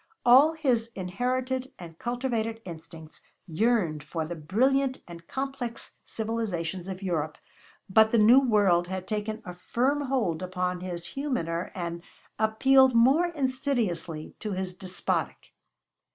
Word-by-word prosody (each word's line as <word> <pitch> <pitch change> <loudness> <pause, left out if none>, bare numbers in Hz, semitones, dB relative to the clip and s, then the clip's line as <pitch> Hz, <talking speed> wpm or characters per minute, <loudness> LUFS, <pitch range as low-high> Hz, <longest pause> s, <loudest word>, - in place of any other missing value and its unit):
All 270 +6 +7
his 250 -8 0
inherited 255 +7 -2
and 165 -2 -11
cultivated 240 -2 -2
instincts 160 -2 -11 0.2
yearned 175 -4 +1
for 160 +1 -3
the 175 +2 -5
brilliant 260 - +1
and 170 -1 -11
complex 265 -3 -4
civilizations 195 -6 -3
of 190 0 -6
Europe, 160 -4 -2 0.5
but 220 +3 +5
the 235 - +2
new 225 +5 +7
world 200 -9 +3
had 185 0 -5
taken 215 +1 -3
a 180 - -6
firm 255 +10 0
hold 220 -11 0
upon 180 0 -2
his 175 -1 -6
humaner 210 - -2
and 170 -2 -4 0.4
appealed 260 +4 +4
more 270 +9 +5
insidiously 255 - -2
to 210 -2 -4
his 185 0 -3
despotic. 185 0 -3
215 Hz, 125 wpm, -27 LUFS, 175-255 Hz, 0.5 s, All